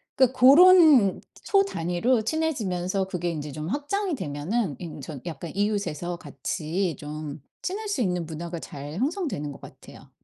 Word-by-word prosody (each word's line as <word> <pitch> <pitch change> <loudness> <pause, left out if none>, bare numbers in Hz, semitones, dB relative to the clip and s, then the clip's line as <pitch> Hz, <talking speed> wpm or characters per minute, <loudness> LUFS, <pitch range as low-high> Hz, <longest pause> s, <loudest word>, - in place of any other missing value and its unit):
그러니까 260 -1 +2
고런 290 - +7 0.2
소단위로 230 - +1
친해지면서 200 - -1
그게 175 -2 -2
인제 150 -2 -5
좀 155 +2 -5
확장이 315 - -1
되면은 150 - -2
인 160 -4 -7
저 145 0 -7
약간 165 -1 -6
이웃에서 180 -5 -1
같이 155 +4 -3
좀 150 -1 -7 0.2
친할 410 +3 -4
수 285 -11 -1
있는 180 -4 0
문화가 165 +2 -6
잘 145 0 -8
형성되는 265 - -2
것 - - -11
같아요. - - -14
180 Hz, 315 characters per minute, -26 LUFS, -, 0.2 s, 고런